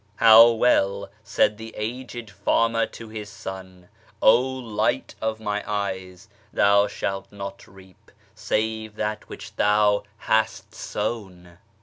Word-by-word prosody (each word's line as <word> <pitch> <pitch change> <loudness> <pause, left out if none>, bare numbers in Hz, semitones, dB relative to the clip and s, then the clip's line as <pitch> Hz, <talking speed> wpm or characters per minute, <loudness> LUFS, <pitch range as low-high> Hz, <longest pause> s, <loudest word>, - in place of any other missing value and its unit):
" - - -38
' - - -36
' - - -38 0.2
How 115 +2 +10
well 100 -4 +1
said 105 0 +1
tlie 110 0 -9
aged 120 0 -6
farmer 115 +1 +1
to 115 - -11
liis 110 -1 -7
son, 95 -3 -9 0.2
" - - -30
O 115 +3 +6
Light 125 - -2
of 110 0 -2
my 105 -1 -2
eyes, 95 -3 -4 0.2
thou 100 0 +4
shaltnot 100 0 -6
reap 95 -1 -18 0.2
save 110 0 -2
that 105 0 -4
which - - -10
thou 105 0 +3 0.2
hast 110 0 0
sown!"' 95 -5 -5
105 Hz, 135 wpm, -24 LUFS, 100-110 Hz, 0.2 s, How